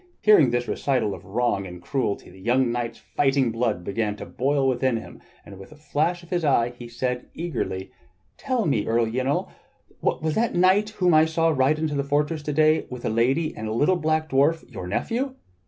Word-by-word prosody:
Hearing 205 Hz, -, +6 dB
this 120 Hz, 0 st, -1 dB
recital 125 Hz, -7 st, 0 dB
of -, -, -9 dB
wrong 100 Hz, -2 st, 0 dB
and 90 Hz, 0 st, -9 dB
cruelty 105 Hz, -1 st, -3 dB
the 95 Hz, -, -15 dB
young 120 Hz, +3 st, +2 dB
knight's 120 Hz, -1 st, -3 dB
fighting 135 Hz, -3 st, +1 dB
blood 115 Hz, -6 st, -1 dB
began 105 Hz, +2 st, -2 dB
to -, -, -8 dB
boil 135 Hz, +1 st, 0 dB
within 130 Hz, -1 st, +1 dB
him, 115 Hz, -, -10 dB, 0.2 s
and 100 Hz, -2 st, -11 dB
with 95 Hz, -, -12 dB
a -, -, -13 dB
flash 155 Hz, +3 st, -1 dB
of 170 Hz, -, -17 dB
his 175 Hz, -2 st, 0 dB
eye 120 Hz, -5 st, +2 dB
he 120 Hz, -1 st, -9 dB
asked 125 Hz, +1 st, -3 dB
eagerly: 95 Hz, -, -4 dB, 0.4 s
"Tell 255 Hz, -5 st, -1 dB
me, 115 Hz, -9 st, 0 dB
Earl 115 Hz, +1 st, +2 dB
Yniol, 130 Hz, +5 st, -1 dB, 0.5 s
was 155 Hz, 0 st, 0 dB
that 230 Hz, +5 st, 0 dB
knight 190 Hz, +4 st, +4 dB
whom 180 Hz, -5 st, +1 dB
I 155 Hz, 0 st, +6 dB
saw 165 Hz, +1 st, +1 dB
ride 145 Hz, 0 st, +2 dB
into 155 Hz, -1 st, -2 dB
the 140 Hz, -1 st, 0 dB
fortress 150 Hz, +3 st, 0 dB
to 150 Hz, 0 st, -3 dB
day 155 Hz, +1 st, +3 dB
with 125 Hz, -1 st, -7 dB
a -, -, +1 dB
lady 130 Hz, +8 st, +1 dB
and 110 Hz, -, -5 dB
a 110 Hz, -, -2 dB
little 150 Hz, +11 st, +3 dB
black 155 Hz, -1 st, 0 dB
dwarf 150 Hz, +4 st, +2 dB
your 90 Hz, -, -6 dB
nephew. 250 Hz, -, -2 dB
135 Hz, 205 wpm, -24 LUFS, 115-160 Hz, 0.5 s, Hearing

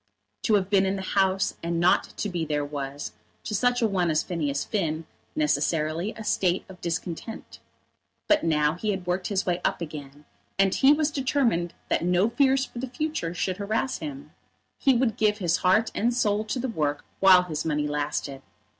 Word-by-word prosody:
To 215 Hz, -, +4 dB
have 195 Hz, -1 st, 0 dB
been 195 Hz, -1 st, +4 dB
in 190 Hz, -, 0 dB
the 190 Hz, -, -4 dB
House 190 Hz, 0 st, +1 dB
and 170 Hz, 0 st, -1 dB
not 175 Hz, +2 st, +4 dB
to -, -, -1 dB
be 175 Hz, -4 st, -2 dB
there 150 Hz, -2 st, -1 dB
was, 145 Hz, 0 st, -5 dB, 0.3 s
to -, -, -5 dB
such 245 Hz, +4 st, +2 dB
a -, -, +5 dB
one 185 Hz, -4 st, +1 dB
as 155 Hz, -1 st, +2 dB
Phineas 150 Hz, -6 st, -2 dB
Finn, 165 Hz, -6 st, -2 dB, 0.3 s
necessarily 155 Hz, +4 st, 0 dB
a 220 Hz, -, -7 dB
state 185 Hz, -3 st, +1 dB
of 185 Hz, -1 st, -13 dB
discontent. 175 Hz, +5 st, -5 dB, 0.7 s
But 310 Hz, 0 st, +4 dB
now 150 Hz, -2 st, +2 dB
he 195 Hz, +5 st, -3 dB
had 190 Hz, -3 st, -2 dB
worked 180 Hz, +1 st, -1 dB
his 195 Hz, -2 st, -1 dB
way 180 Hz, -1 st, 0 dB
up -, -, 0 dB
again, 150 Hz, -3 st, -8 dB, 0.3 s
and 195 Hz, -1 st, +3 dB
he 270 Hz, +1 st, +5 dB
was 300 Hz, 0 st, +2 dB
determined 255 Hz, -, 0 dB
that -, -, +1 dB
no 180 Hz, +5 st, +2 dB
fears 270 Hz, +1 st, +3 dB
for 240 Hz, -, -9 dB
the 260 Hz, +1 st, -4 dB
future 250 Hz, -, -3 dB
should 185 Hz, +1 st, -1 dB
harass 215 Hz, +6 st, -1 dB
him. 285 Hz, -1 st, -7 dB, 0.5 s
He 270 Hz, -3 st, +4 dB
would 235 Hz, -3 st, +1 dB
give 210 Hz, -1 st, +2 dB
his 175 Hz, -4 st, +1 dB
heart 190 Hz, +5 st, +3 dB
and 235 Hz, +3 st, +1 dB
soul 215 Hz, -3 st, +1 dB
to 215 Hz, -, -3 dB
the 255 Hz, +1 st, -2 dB
work 150 Hz, -, -2 dB
while 185 Hz, -2 st, +7 dB
his 155 Hz, -3 st, -4 dB
money 150 Hz, -2 st, 0 dB
lasted. 145 Hz, -2 st, -3 dB
185 Hz, 190 wpm, -26 LUFS, 160-220 Hz, 0.7 s, while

